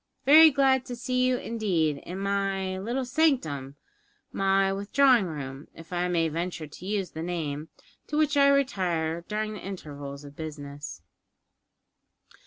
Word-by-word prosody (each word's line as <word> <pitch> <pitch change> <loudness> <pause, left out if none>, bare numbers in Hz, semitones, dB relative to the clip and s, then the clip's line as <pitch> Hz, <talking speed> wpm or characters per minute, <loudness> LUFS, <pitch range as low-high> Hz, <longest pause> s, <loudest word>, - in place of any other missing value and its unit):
"Very 315 +3 +9
glad 265 -2 +3
to 245 - -5
see 255 +1 0
you, 255 -1 +2
indeed, 185 -12 0
in 180 +5 -7
my 195 -1 -1
little 240 +6 -2
sanctum, 245 - 0 0.6
my 195 0 +2
withdrawing 230 +2 +3
room, 140 -3 -7
if 165 +2 -11
I 175 0 0
may 170 -2 +1
venture 165 +1 -3
to 150 +4 -12
use 200 -3 -2
the 160 - -6
name, 160 -3 -4 0.4
to 300 - -2
which 305 -1 +2
I 280 -1 +6
retire 180 -12 +1
during 215 0 -2
the 210 - -7
intervals 145 -7 -7
of 145 0 -12
business." 145 - -7
190 Hz, 145 wpm, -27 LUFS, 160-245 Hz, 0.6 s, Very